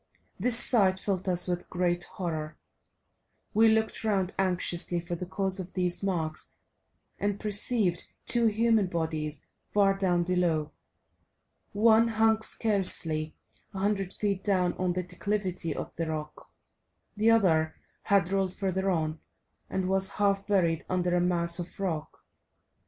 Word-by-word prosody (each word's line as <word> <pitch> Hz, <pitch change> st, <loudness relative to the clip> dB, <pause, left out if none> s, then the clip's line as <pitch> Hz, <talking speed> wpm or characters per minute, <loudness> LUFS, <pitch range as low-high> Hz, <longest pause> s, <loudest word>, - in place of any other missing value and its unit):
This 235 Hz, +4 st, +4 dB
sight 195 Hz, -8 st, +4 dB
filled 190 Hz, -1 st, -2 dB
us 180 Hz, 0 st, +4 dB
with 175 Hz, -1 st, -3 dB
great 175 Hz, -1 st, -1 dB
horror; 160 Hz, -4 st, -5 dB, 1.0 s
we 225 Hz, +1 st, +5 dB
looked 220 Hz, 0 st, +2 dB
round 195 Hz, -4 st, 0 dB
anxiously 180 Hz, -2 st, +1 dB
for 170 Hz, +1 st, -6 dB
the 180 Hz, +1 st, -6 dB
cause 190 Hz, +1 st, -1 dB
of 185 Hz, -1 st, -7 dB
these 180 Hz, -1 st, -1 dB
marks 165 Hz, -5 st, -2 dB, 0.6 s
and 205 Hz, 0 st, -1 dB
perceived 210 Hz, -3 st, 0 dB, 0.2 s
two 235 Hz, -1 st, +3 dB
human 220 Hz, -1 st, +2 dB
bodies 160 Hz, -4 st, -3 dB, 0.2 s
far 195 Hz, -1 st, +3 dB
down 180 Hz, -3 st, +1 dB
below. 170 Hz, -4 st, 0 dB, 1.0 s
One 220 Hz, +2 st, +4 dB
hung 220 Hz, 0 st, +2 dB
scarcely 180 Hz, -9 st, +1 dB, 0.4 s
a -, -, -4 dB
hundred 195 Hz, -1 st, -1 dB
feet 200 Hz, -3 st, -2 dB
down 185 Hz, -3 st, +1 dB
on 180 Hz, -1 st, 0 dB
the 180 Hz, +1 st, -2 dB
declivity 180 Hz, -2 st, -3 dB
of -, -, -6 dB
the 165 Hz, -1 st, -3 dB
rock, 155 Hz, -1 st, -6 dB, 0.6 s
the 215 Hz, +2 st, +2 dB
other 165 Hz, -8 st, +3 dB, 0.3 s
had 195 Hz, -3 st, +2 dB
rolled 195 Hz, -2 st, 0 dB
further 190 Hz, 0 st, -1 dB
on, 160 Hz, -3 st, -1 dB, 0.5 s
and 190 Hz, -1 st, -2 dB
was 190 Hz, 0 st, +1 dB
half 200 Hz, -1 st, +1 dB
buried 170 Hz, -6 st, +1 dB
under 180 Hz, -1 st, 0 dB
a 175 Hz, -, +2 dB
mass 170 Hz, -1 st, +2 dB
of 175 Hz, +2 st, -7 dB
rock. 165 Hz, -6 st, -4 dB
185 Hz, 140 wpm, -28 LUFS, 175-205 Hz, 1.0 s, we